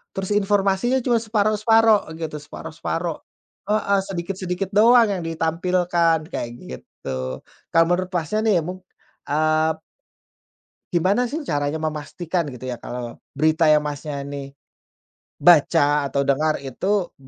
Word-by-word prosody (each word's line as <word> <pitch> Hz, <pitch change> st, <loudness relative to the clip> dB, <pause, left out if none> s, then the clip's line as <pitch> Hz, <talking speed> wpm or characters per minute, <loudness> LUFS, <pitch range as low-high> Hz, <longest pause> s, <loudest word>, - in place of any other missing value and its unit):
Terus 195 Hz, +1 st, -3 dB
informasinya 205 Hz, +4 st, +2 dB
cuma 240 Hz, -1 st, +2 dB
separuh-separuh, 215 Hz, -2 st, +3 dB
gitu, 160 Hz, -2 st, -4 dB
separuh-separuh. 160 Hz, +2 st, -5 dB, 0.5 s
Heeh, 205 Hz, -2 st, +2 dB
sedikit-sedikit 185 Hz, 0 st, -4 dB
doang 230 Hz, +2 st, +6 dB
yang 190 Hz, -4 st, -2 dB
ditampilkan, 165 Hz, +1 st, +1 dB
kayak 120 Hz, -, -3 dB
gitu. 65 Hz, 0 st, -6 dB, 0.3 s
Kalau 165 Hz, 0 st, +6 dB
menurut 180 Hz, +1 st, 0 dB
Masnya, 175 Hz, +4 st, -1 dB
nih, 205 Hz, -5 st, +4 dB
mung 185 Hz, +2 st, -6 dB, 0.5 s
eee 155 Hz, +2 st, +2 dB, 1.2 s
gimana, 190 Hz, +8 st, +2 dB
sih, 285 Hz, +7 st, -3 dB
caranya 145 Hz, -, -2 dB
memastikan, 160 Hz, +3 st, -3 dB
gitu, 125 Hz, +1 st, -8 dB
ya, 125 Hz, -, -3 dB
kalau 120 Hz, 0 st, -7 dB, 0.2 s
berita, 155 Hz, +3 st, +2 dB
yang 155 Hz, -1 st, +5 dB
Masnya, 145 Hz, -1 st, -5 dB
nih, 140 Hz, -1 st, -7 dB, 0.9 s
baca 145 Hz, -3 st, +4 dB
atau 140 Hz, 0 st, 0 dB
dengar 150 Hz, +3 st, +1 dB
itu 175 Hz, +8 st, -2 dB
165 Hz, 120 wpm, -22 LUFS, 150-195 Hz, 1.2 s, doang